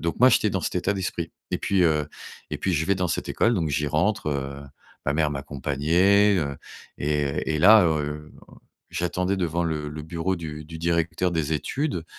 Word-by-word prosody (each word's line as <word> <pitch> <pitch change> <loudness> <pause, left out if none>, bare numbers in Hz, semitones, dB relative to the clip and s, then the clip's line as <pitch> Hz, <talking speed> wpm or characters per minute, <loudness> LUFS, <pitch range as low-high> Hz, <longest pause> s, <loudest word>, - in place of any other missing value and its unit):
donc 85 +4 -3
moi, 130 - +8
j'étais 105 - +3
dans 95 - -1
cet - - -2
état 90 +3 +1
d'esprit 90 -4 -4 0.2
et - - -1
puis, 95 -2 +1
heu, 75 -3 +2 0.4
et - - -2
puis 95 - -1
je 80 -1 0
vais 100 - +3
dans 90 -1 -1
cette - - -2
école, 115 - +2
donc 85 -6 0
j'y 75 0 0
rentre, 80 +3 0
heu, 70 0 -3 0.4
ma 70 - +2
mère 75 -1 +1
m'accompagnait, 80 +9 +2
heu, 70 -5 -2 0.4
et 75 +1 -1
et - - -2
là, 105 +4 +8
heu, 75 -1 -2 0.2
un - - -16 0.4
j'attendais 90 +3 -1
devant 85 -2 -1
le 75 -2 -2
le 75 +1 -6
bureau 85 +4 -2
du 75 -3 -7
du 80 +1 -9
directeur 85 +2 0
des 80 -3 -1
études, 90 - -2
80 Hz, 195 wpm, -25 LUFS, 75-90 Hz, 0.4 s, moi